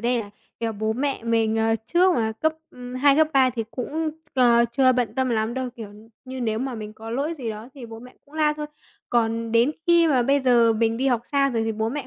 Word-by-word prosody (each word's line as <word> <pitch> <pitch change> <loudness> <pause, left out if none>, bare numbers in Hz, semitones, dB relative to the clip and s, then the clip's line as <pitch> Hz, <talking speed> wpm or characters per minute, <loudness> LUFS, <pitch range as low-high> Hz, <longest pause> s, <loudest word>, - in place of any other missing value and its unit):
đây 240 +1 +1
là, 205 -2 -9 0.3
kiểu, 225 -1 -1
bố 215 +1 -2
mẹ 270 0 -2
mình, 225 -1 +1
ờ, 225 0 +2
trước 360 +1 +3
mà 220 -2 0
cấp, 315 +8 0 0.2
ừm, 250 0 -9
2, 275 +2 +4
cấp 310 -1 +4
3 265 -1 +4
thì 230 -2 -4
cũng, 310 +5 -3 0.2
ờ, 235 -2 +5
chưa 260 0 +4
bận 240 -3 -1
tâm 260 -1 0
lắm 220 +1 -1
đâu, 260 -1 -3
kiểu 210 -3 -9 0.3
như, 260 0 -7
nếu 220 -2 -1
mà 260 0 -3
mình 215 -1 -7
có 225 +1 -10
lỗi 285 +7 -2
gì 245 -7 -5
đó 215 +3 -8
thì 250 -4 -9
bố 225 0 -10
mẹ 250 +2 -14
cũng 290 +2 -21
la 305 -1 +2
thôi. 300 0 -6 0.4
Còn 230 -1 0
đến 235 +5 +4 0.2
khi 340 -1 +5
mà 255 -4 +3
bây 275 +3 +2
giờ 240 -3 +4
mình 225 0 0
đi 265 +3 -1
học 245 -3 +2
xa 275 -1 +3
rồi 230 -3 -1
thì 225 - -1
bố 220 +1 -2
mẹ 285 +2 -5
245 Hz, 255 wpm, -23 LUFS, 225-275 Hz, 0.4 s, ờ